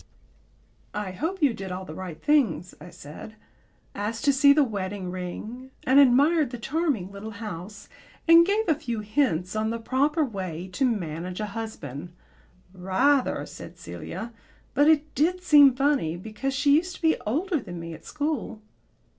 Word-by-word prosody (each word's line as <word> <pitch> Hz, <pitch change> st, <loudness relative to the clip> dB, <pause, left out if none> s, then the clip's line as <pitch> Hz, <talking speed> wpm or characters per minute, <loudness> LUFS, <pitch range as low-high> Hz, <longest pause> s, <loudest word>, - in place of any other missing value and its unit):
"I 205 Hz, -2 st, -3 dB
hope 330 Hz, -, -3 dB
you 275 Hz, -5 st, +4 dB
did 195 Hz, -3 st, -7 dB
all 185 Hz, +1 st, -5 dB
the 155 Hz, -, -8 dB
right 175 Hz, -2 st, -7 dB
things," 230 Hz, -, +1 dB
I 180 Hz, -, -10 dB
said. 170 Hz, +5 st, -11 dB, 0.6 s
"Asked 220 Hz, +4 st, -3 dB
to 280 Hz, -, +5 dB
see 280 Hz, +1 st, +6 dB
the 295 Hz, +1 st, +5 dB
wedding 195 Hz, -5 st, -4 dB
ring, 215 Hz, +8 st, -6 dB
and 265 Hz, +2 st, +5 dB
admired 285 Hz, +3 st, +5 dB
the 245 Hz, -, -6 dB
charming 265 Hz, -, -1 dB
little 200 Hz, +2 st, -7 dB
house, 205 Hz, -1 st, -7 dB, 0.4 s
and 335 Hz, +1 st, +9 dB
gave 410 Hz, +4 st, 0 dB
a 320 Hz, -, +5 dB
few 235 Hz, -7 st, -4 dB
hints 210 Hz, -, 0 dB
on 215 Hz, 0 st, 0 dB
the 230 Hz, -, -2 dB
proper 285 Hz, +7 st, +1 dB
way 185 Hz, -, -5 dB
to 270 Hz, -, +1 dB
manage 180 Hz, -5 st, -3 dB
a 215 Hz, -, -1 dB
husband." 175 Hz, -, -6 dB, 0.6 s
"Rather," 190 Hz, +10 st, +1 dB
said -, -, -11 dB
Celia. 230 Hz, +1 st, -7 dB, 0.4 s
"But 290 Hz, +2 st, +4 dB
it 305 Hz, -1 st, +3 dB
did 360 Hz, +6 st, +1 dB
seem 290 Hz, -6 st, +7 dB
funny, 270 Hz, -, +1 dB
because 220 Hz, +8 st, -4 dB
she 285 Hz, +1 st, +4 dB
used 350 Hz, +2 st, -2 dB
to -, -, -14 dB
be 320 Hz, 0 st, +3 dB
older 320 Hz, -, 0 dB
than 175 Hz, -8 st, -8 dB
me 165 Hz, 0 st, -7 dB
at -, -, -12 dB
school." 295 Hz, -7 st, -3 dB
230 Hz, 165 wpm, -26 LUFS, 185-290 Hz, 0.6 s, and